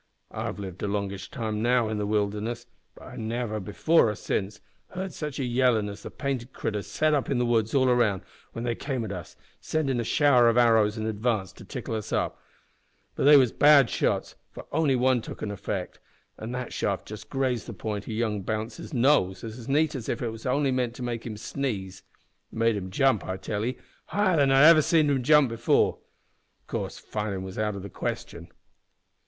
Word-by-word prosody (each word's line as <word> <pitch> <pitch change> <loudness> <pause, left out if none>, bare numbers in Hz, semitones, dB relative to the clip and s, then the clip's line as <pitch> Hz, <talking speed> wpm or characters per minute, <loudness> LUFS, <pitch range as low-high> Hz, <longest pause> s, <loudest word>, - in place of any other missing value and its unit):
I've - - -4
lived 95 -3 -7
a - - -1
longish 100 -1 -3
time 110 -2 -3
now 120 0 +3
in 110 -1 -2
the 105 - -1
wilderness, 105 +3 -1 0.3
but - - -14
I - - -10
never, 110 -1 -3
before 110 - +2
or 105 - -2
since, 100 +1 -3 0.3
heard 185 0 -5
sitch 150 -3 -5
a 140 - -1
yellin' 120 -3 +2
as 100 +1 -9
the - - -7
painted 130 -3 -4
critters 105 -2 -3
set 155 0 +1
up 140 -3 0
in 135 - +1
the 120 - +1
woods 115 0 +1
all 130 -1 +4
around 120 -6 +2 0.3
when 115 - -5
they 120 -1 0
came 130 -1 -3
at 105 - -5
us, - - -7 0.2
sendin' 140 -6 -1
a - - 0
shower 125 0 +4
o' 115 - +1
arrows 110 -2 +4
in 110 - -3
advance 110 -3 -1
to - - -13
tickle - - -6
us 110 -2 -4
up; - - -1 0.7
but - - -1
they 145 0 +9
was 130 -5 +4
bad 145 -4 +6
shots, - - 0 0.2
for - - -10
only 150 -3 +2
one 125 -1 +2
took - - -8
effect, 100 -3 -4 0.4
an' 110 +2 -5
that 125 -1 -5
shaft 100 -2 -1
just 105 0 -9
grazed 130 -4 -1
the - - -5
point 105 +1 -5
o' - - -3
young 110 -2 -1
Bounce's 110 - -4
nose 120 -7 +3
as 115 +3 -8
neat 150 +2 +2
as 125 -6 -5
if - - -1
it 120 - -1
was 115 +3 -7
only 140 +1 +2
meant 125 -2 -1
to 125 - -7
make 120 -1 -4
him 110 -2 -6
sneeze. 100 -6 -4 0.5
It - - -13
made 115 0 +3
him 95 -2 -4
jump, 130 +2 +2
I 95 - -4
tell 105 +2 -3
'ee, 125 +3 -2 0.3
higher 195 -4 +2
than 140 -2 +4
I 135 +1 +6
ever 160 0 +8
seed 155 -1 +3
him 135 -2 +1
jump 150 0 +5
before. 115 0 +2 0.6
Of - - -42
course - - -4
fightin' 105 -3 -4
was 95 +2 -7
out 105 -1 0
o' - - -5
the 100 - -7
question. - - -5
115 Hz, 210 wpm, -27 LUFS, 105-135 Hz, 0.7 s, they